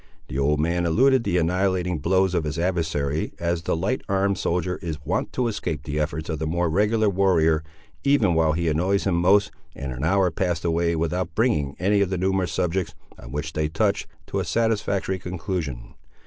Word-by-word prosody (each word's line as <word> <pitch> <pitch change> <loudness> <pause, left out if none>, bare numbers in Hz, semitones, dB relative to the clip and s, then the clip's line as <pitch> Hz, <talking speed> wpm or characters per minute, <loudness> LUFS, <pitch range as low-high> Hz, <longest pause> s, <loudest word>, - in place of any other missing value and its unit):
The 65 - -3
old 75 +2 +2
man 85 +2 +1
eluded 130 +8 +4
the 95 -4 0
annihilating 90 0 +1
blows 95 +2 +2
of 85 -3 +1
his 75 +1 -3
adversary, 80 -4 -1
as 85 0 -1
the 80 - -1
light 95 +10 -1
armed 100 0 +1
soldier 90 +1 -1
is 80 -5 -4
wont 90 - -1
to 125 -2 0
escape 100 -8 -3
the 75 +1 -3
efforts 80 +1 -2
of 80 -3 -3
the 80 - -2
more 85 +1 0
regular 105 +4 +2
warrior, 85 -5 +3 0.4
even 140 -10 +3
while 80 -1 +3
he 85 +1 -1
annoys 90 +6 +1
him 95 - +1
most, 95 +4 +3 0.2
and 70 -1 -5
an 65 +2 -5
hour 95 +2 +3
passed 85 -1 -1
away 85 0 +1
without 85 +1 -2
bringing 90 - +1
any 100 +2 +2
of 100 - +1
the 95 - -1
numerous 95 0 0
subjects, 90 -3 -1 0.2
on - - -10
which 75 +3 -4
they 75 0 0
touched, 80 - 0 0.2
to - - -3
a - - 0
satisfactory 105 -4 0
conclusion. 85 -7 -4
85 Hz, 190 wpm, -24 LUFS, 80-95 Hz, 0.4 s, eluded